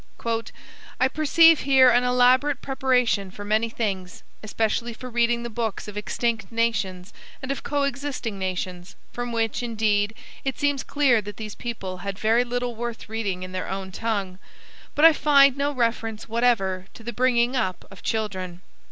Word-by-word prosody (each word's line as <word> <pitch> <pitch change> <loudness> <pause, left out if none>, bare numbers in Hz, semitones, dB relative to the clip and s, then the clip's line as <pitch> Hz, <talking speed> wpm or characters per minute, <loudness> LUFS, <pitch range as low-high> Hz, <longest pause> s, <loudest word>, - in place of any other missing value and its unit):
"I 260 - +4
perceive 315 +3 +5
here 265 -2 +5
an 245 +1 +3
elaborate 250 +3 +3
preparation 250 -7 +1
for 205 +2 -9
many 215 +2 +1
things; 195 -6 -4 0.2
especially 225 +2 -1
for 250 +2 -9
reading 235 0 +1
the 235 - -4
books 225 -2 -3
of 210 - -8
extinct 220 0 -2
nations 210 -5 -1 0.3
and 260 0 -4
of 275 - -3
coexisting 280 -6 -2
nations 185 0 -4 0.2
(from 245 0 -4
which, 225 0 -1
indeed, 215 -2 0 0.3
it 270 -1 -2
seems 285 -2 +1
clear 270 -6 +2
that 205 +1 -9
these 215 -2 -6
people 195 -6 -5
had 195 +1 -5
very 225 +3 +3
little 245 0 -3
worth 235 -1 -6
reading 205 -5 -3
in 185 - -7
their 185 0 -4
own 190 0 -5
tongue); 200 -3 -3 0.6
but 300 - +5
I 325 - +9
find 280 -3 +5
no 285 +1 0
reference 230 -4 -2
whatever 215 -6 +1
to 230 - -12
the 240 +1 -5
bringing 245 +1 +2
up 190 -7 -2
of 195 - -13
children. 185 -5 -3
230 Hz, 160 wpm, -24 LUFS, 205-250 Hz, 0.6 s, I